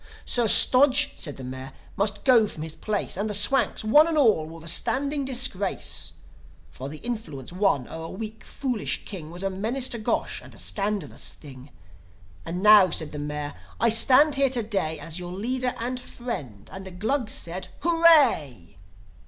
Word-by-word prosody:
Sir 240 -2 +1
Stodge 270 +5 +5
(said 145 -4 -4
the 135 - -8
Mayor), 130 +1 -8 0.2
must 205 0 -1
go 240 -5 +4
from 155 -6 -7
his 160 -1 -7
place; 210 +5 -3
And 210 +2 -2
the 210 - -1
Swanks, 220 +6 +1
one 295 +9 +5
and 325 -2 -1
all, 215 - +3
were 165 0 -12
a - - -11
standing 280 - +1
disgrace! 250 -7 0 0.6
For 130 - -8
the 155 - -8
influence 170 - -6
won 180 -10 0
o'er 160 0 -8
a - - -8
weak, 220 +2 -8
foolish 250 -6 -3
king 175 -7 -7
Was 175 +3 -9
a 195 - -1
menace 230 +7 -1
to 235 - -3
Gosh, 215 - -2
and - - -15
a - - -16
scandalous 200 -6 -2
thing! 135 -2 -13 0.8
"And 180 +3 -4
now," 210 -3 +7
said 160 -2 -2
the 150 - -6
Mayor, 145 0 -5 0.3
"I 235 - +3
stand 260 +6 +5
here 275 -1 +3
to 245 -3 -2
day 195 -7 -2
As 160 +3 -4
your 175 0 -7
leader 250 +5 -2
and 250 +2 -3
friend." 145 - -7
And 190 0 -8
the 190 - -8
Glugs 220 +7 -2
said, 180 +2 -4
"Hooray!" 280 - +3
205 Hz, 180 wpm, -25 LUFS, 160-250 Hz, 0.8 s, now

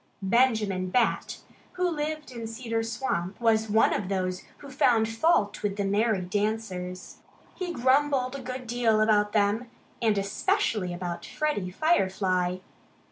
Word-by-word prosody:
Benjamin 210 -4 +2
Bat, 235 +4 0 0.3
who 365 0 0
lived 305 -3 -3
in 230 -2 -6
Cedar 225 0 -3
Swamp, 215 -5 -3
was 220 -2 +2
one 220 +2 +4
of 195 -2 -2
those 185 -1 -1 0.2
who 280 - -11
found 235 -4 +3
fault 225 -2 +1
with 200 -1 -1
the 200 - 0
merry 205 0 +1
dancers. 185 -2 -3 0.4
He 365 -2 -4
grumbled 265 -1 +2
a 275 - -6
good 255 0 -6
deal 230 -2 +2
about 210 -1 +3
them 215 +3 +1 0.3
and 220 -3 +2
especially 200 -1 0
about 175 -1 -5
Freddie 300 -12 -2
Firefly. 185 - +1
220 Hz, 135 wpm, -27 LUFS, 195-255 Hz, 0.4 s, one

